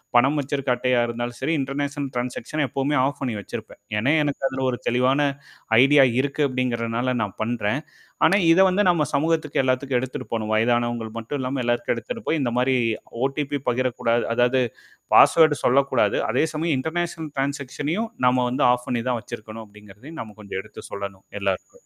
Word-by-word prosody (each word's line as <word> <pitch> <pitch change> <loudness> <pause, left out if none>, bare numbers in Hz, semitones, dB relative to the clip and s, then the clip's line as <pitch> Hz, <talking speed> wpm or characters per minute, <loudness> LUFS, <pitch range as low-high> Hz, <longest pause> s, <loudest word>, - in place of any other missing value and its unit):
பணம் 135 +5 +4
வச்சிருக்க 140 -1 -2
அட்டையா 125 0 +1
இருந்தாலும் 120 0 -4
செரி, 165 - 0
இன்டர்நேஷனல் 140 +1 -3
ட்ரான்ஸாக்ஸன 125 +4 -2
எப்பவுமே 140 +3 0
ஆஃப் 140 +2 -1
பண்ணி 125 -4 -2
வச்சிருப்பேன். - - -8 0.2
ஏன்னா, 130 +8 +2
எனக்கு 145 -1 -3
அதுல 130 0 -3
ஒரு 120 - -3
தெளிவான 125 +3 +2 0.6
ஐடியா 135 0 +6
இருக்கு 140 +2 -1
அப்படிங்கிறனால 125 -1 -1
நான் 100 -3 -4
பண்றேன். 115 +3 -1 0.4
ஆனா, 195 - +5
இத 170 - +5
வந்து 185 +3 +2
நம்ம 170 -3 +2
சமூகத்துக்கு 155 0 +1
எல்லாத்துக்கும் 130 0 0
எடுத்துட்டு 130 +1 -5
போணும். 110 -1 -2
வயதானவங்கள் 120 0 0
மட்டும் 115 +6 -4
இல்லாம, 130 +1 -2
எல்லாத்துக்கும் 120 0 0
எடுத்துட்டு 230 - -6
போய், 160 - +1
இந்த 120 -3 0
மாரி 130 +1 +2 0.5
ஓடிபி 140 +1 -1
பகிரக்கூடாது 120 -1 0
அதாவது 125 +2 +3 0.5
பாஸ்வேர்ட் 155 -3 +6
சொல்லக்கூடாது. 130 -4 +3
அதே 125 +7 +2
சமயம் 155 -2 0
இன்டர்நேஷனல் 160 +1 -3
ட்ரான்ஸாக்ஸனையும் 140 - -2 0.2
நம்ம 125 +1 +3
வந்து 125 - +1
ஆஃப் 125 0 -1
பண்ணி 120 -2 -1
தான் 125 -2 0
வச்சிருக்கணும் 110 -1 -9
அப்படிங்கிறதையும் 105 +9 -13
நம்ம 110 -2 -10
கொஞ்சம் 100 -2 -5
எடுத்து - - -12
சொல்லணும் 100 -1 -7
எல்லாருக்கும். 100 - -4
130 Hz, 160 wpm, -23 LUFS, 120-145 Hz, 0.6 s, ஐடியா